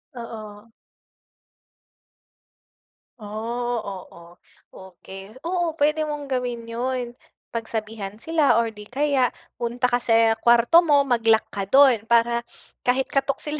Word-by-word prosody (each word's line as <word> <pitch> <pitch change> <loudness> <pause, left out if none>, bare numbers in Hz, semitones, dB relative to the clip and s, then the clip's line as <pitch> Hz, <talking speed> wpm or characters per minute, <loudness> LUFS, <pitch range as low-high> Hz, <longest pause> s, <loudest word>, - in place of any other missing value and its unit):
Oo. 220 -2 -9 2.5
Oh, 230 +3 -4
oo 175 -3 -10 0.3
okey, 190 +3 -12
oo 345 -2 -1
puwede 305 0 +1
mong 290 -2 -6
gawin 245 -2 -2
yun 245 +1 -3 0.4
pagsabihan 220 -3 -5
sila 305 +3 +2
or 230 -1 +1
di 210 -1 -12
kaya 275 0 +1 0.3
punta 245 +1 -1
ka 245 - +2
sa 225 -1 +3
kuwarto 240 +7 +5
mo 295 -5 +4
mag-lock 225 -4 +3
ka 195 -1 -4
dun 255 -3 +5
para 235 0 +2 0.4
kahit 260 +1 +1
katok 275 0 +1
sila 300 0 -4
235 Hz, 115 wpm, -23 LUFS, 220-270 Hz, 2.5 s, kuwarto